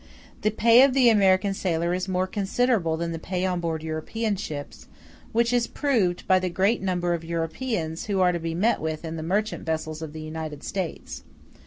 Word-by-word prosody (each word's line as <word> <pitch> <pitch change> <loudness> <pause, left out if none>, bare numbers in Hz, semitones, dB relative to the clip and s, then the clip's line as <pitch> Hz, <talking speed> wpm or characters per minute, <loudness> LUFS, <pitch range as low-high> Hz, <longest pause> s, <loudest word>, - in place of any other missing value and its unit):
The 215 - +2
pay 230 +3 +6
of 270 -1 +5
the 255 -3 +6
American 195 -2 +4
sailor 170 -2 -1
is 185 +1 -2
more 185 0 0
considerable 200 -3 0
than 170 0 -2
the 165 - -4
pay 180 +2 -2
on 180 -1 0
board 165 -2 -3
European 200 +8 -2
ships; 150 -7 -7 0.4
which 235 +1 +2
is 240 -1 +2
proved 220 -12 0
by 185 0 +5
the 185 0 -2
great 195 +6 +1
number 175 -2 0
of 165 -1 -3
Europeans 165 +1 -3
who 200 -2 0
are 180 -1 +4
to 175 - -2
be 165 0 -3
met 215 +7 +2
with 155 +1 -3
in 160 0 -4
the 160 - -5
merchant 205 +7 -1
vessels 160 -1 -3
of 160 -2 -6
the 160 - -7
United 155 -2 -6
States. 185 -4 -5
180 Hz, 200 wpm, -25 LUFS, 160-210 Hz, 0.4 s, pay